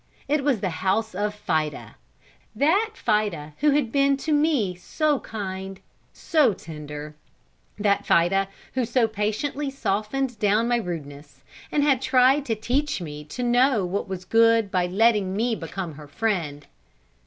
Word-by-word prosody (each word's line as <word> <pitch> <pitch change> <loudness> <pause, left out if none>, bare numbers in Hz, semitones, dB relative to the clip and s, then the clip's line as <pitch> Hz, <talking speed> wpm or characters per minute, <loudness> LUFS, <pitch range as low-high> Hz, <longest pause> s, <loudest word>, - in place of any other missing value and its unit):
It 290 0 +1
was 265 -8 +1
the 190 - -1
house 210 +3 0
of 205 +2 -2
Fida 155 -8 -2 0.6
that 385 - +2
Fida 205 -9 -1
who 300 - +4
had 280 -5 +1
been 275 0 +3
to 310 +3 -3
me 290 - +2
so 290 - 0
kind, 190 -2 -6 0.3
so 295 -9 +2
tender; 150 -1 -8 0.6
that 205 -1 +1
Fida, 190 +3 +3 0.3
who 255 - 0
so 235 0 +2
patiently 220 +7 -2
softened 245 0 -2
down 210 +3 +2
my 240 0 +2
rudeness, 145 - -7 0.3
and 295 - +2
had 275 -3 +3
tried 260 +2 +4
to 225 - 0
teach 255 +7 -1
me 150 -3 -7
to 250 +11 -5
know 245 -3 +3
what 195 +4 -2
was 185 -1 -6
good 230 -2 +4
by 180 -1 +1
letting 200 0 +2
me 230 +3 +1
become 190 -6 -5
her 150 0 -11
friend. 160 -6 -2
215 Hz, 150 wpm, -24 LUFS, 185-260 Hz, 0.6 s, who